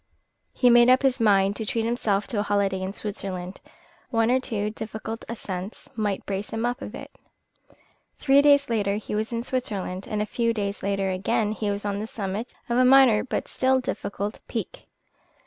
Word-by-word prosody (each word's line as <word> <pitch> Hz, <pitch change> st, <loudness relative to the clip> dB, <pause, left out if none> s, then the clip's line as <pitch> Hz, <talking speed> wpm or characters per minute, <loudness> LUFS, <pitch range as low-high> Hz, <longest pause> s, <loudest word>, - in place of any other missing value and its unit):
He 250 Hz, -2 st, +4 dB
made 240 Hz, +1 st, +7 dB
up 255 Hz, +2 st, +5 dB
his 265 Hz, -1 st, +2 dB
mind 200 Hz, -3 st, +3 dB
to 220 Hz, -, -3 dB
treat 225 Hz, +1 st, 0 dB
himself 215 Hz, -4 st, 0 dB
to 220 Hz, -, -2 dB
a -, -, +2 dB
holiday 200 Hz, -2 st, 0 dB
in 190 Hz, +1 st, -3 dB
Switzerland. 195 Hz, -3 st, -5 dB, 0.5 s
One 230 Hz, -1 st, +2 dB
or 260 Hz, -, +4 dB
two 215 Hz, -5 st, -2 dB
difficult 220 Hz, +1 st, -6 dB
ascents 195 Hz, -3 st, -6 dB
might 205 Hz, -3 st, -2 dB
brace 200 Hz, +1 st, -3 dB
him 225 Hz, +1 st, -2 dB
up 245 Hz, +1 st, -2 dB
a -, -, -5 dB
bit. -, -, -9 dB, 1.1 s
Three 275 Hz, 0 st, +5 dB
days 285 Hz, -1 st, +5 dB
later 205 Hz, -4 st, 0 dB
he 210 Hz, -, -5 dB
was 215 Hz, +2 st, -1 dB
in 230 Hz, 0 st, -2 dB
Switzerland, 205 Hz, -8 st, -3 dB
and 215 Hz, -, -1 dB
a 210 Hz, -, 0 dB
few 230 Hz, +1 st, 0 dB
days 200 Hz, -1 st, -3 dB
later 195 Hz, -1 st, 0 dB
again 205 Hz, +3 st, 0 dB
he 215 Hz, -1 st, -2 dB
was 200 Hz, 0 st, -3 dB
on 200 Hz, 0 st, -1 dB
the 215 Hz, -, -4 dB
summit 210 Hz, +1 st, -5 dB
of 235 Hz, +1 st, +1 dB
a -, -, +6 dB
minor 255 Hz, -4 st, +6 dB
but 255 Hz, -, -3 dB
still 260 Hz, 0 st, +2 dB
difficult 205 Hz, -4 st, -4 dB
peak. -, -, -5 dB
215 Hz, 190 wpm, -25 LUFS, 200-240 Hz, 1.1 s, made